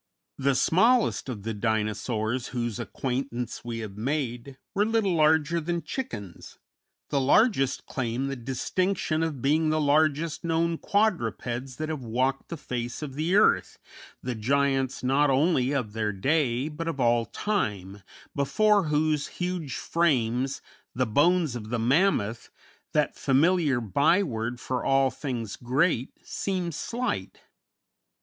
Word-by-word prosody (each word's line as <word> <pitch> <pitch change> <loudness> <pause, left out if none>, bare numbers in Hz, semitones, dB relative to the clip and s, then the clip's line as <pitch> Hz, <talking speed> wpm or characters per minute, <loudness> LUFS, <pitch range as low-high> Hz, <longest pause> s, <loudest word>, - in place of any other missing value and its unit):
The 140 0 +2
smallest 225 - +3
of 105 -6 -5
the 115 +1 -3
Dinosaurs 110 +2 -1
whose 120 -3 -3
acquaintance 125 -2 -4
we 120 -1 -4
have 100 -1 -10
made 130 +1 -3 0.2
were 200 - +2
little 220 -3 +1
larger 160 +1 +3
than 170 +1 -2
chickens; 105 - -6 0.5
the 140 - +2
largest 135 - +3
claim 125 0 -2
the 135 0 -3
distinction 155 +7 -1
of 155 -6 -2
being 155 +3 +3
the 155 0 +1
largest 155 +2 +2
known 165 0 0
quadrupeds 130 - -1
that 155 +2 -4
have 155 -5 -4
walked 130 +4 -1
the 170 - -5
face 125 -1 -4
of 140 -3 -5
the 160 +6 0
earth, 210 - +3 0.5
the 125 - -2
giants 135 +3 0
not 140 +3 +3
only 135 -1 +2
of 125 -7 -2
their 110 -1 -1
day, 130 +4 +1
but 160 +2 -5
of 160 -4 -3
all 120 -2 +2
time, 105 - -2 0.3
before 205 +7 +3
whose 150 -1 +1
huge 180 -5 -4
frames 135 -5 0 0.3
the - - +1
bones 155 +4 +2
of 110 -3 -6
the 120 - -1
Mammoth, 115 - +1 0.4
that 150 -1 +1
familiar 150 0 +2
byword 120 - +1
for 130 0 -3
all 135 -1 +3
things 120 -7 -4
great, 130 +1 +1
seem 185 -3 -2
slight. 230 - -3
135 Hz, 135 wpm, -27 LUFS, 120-165 Hz, 0.5 s, smallest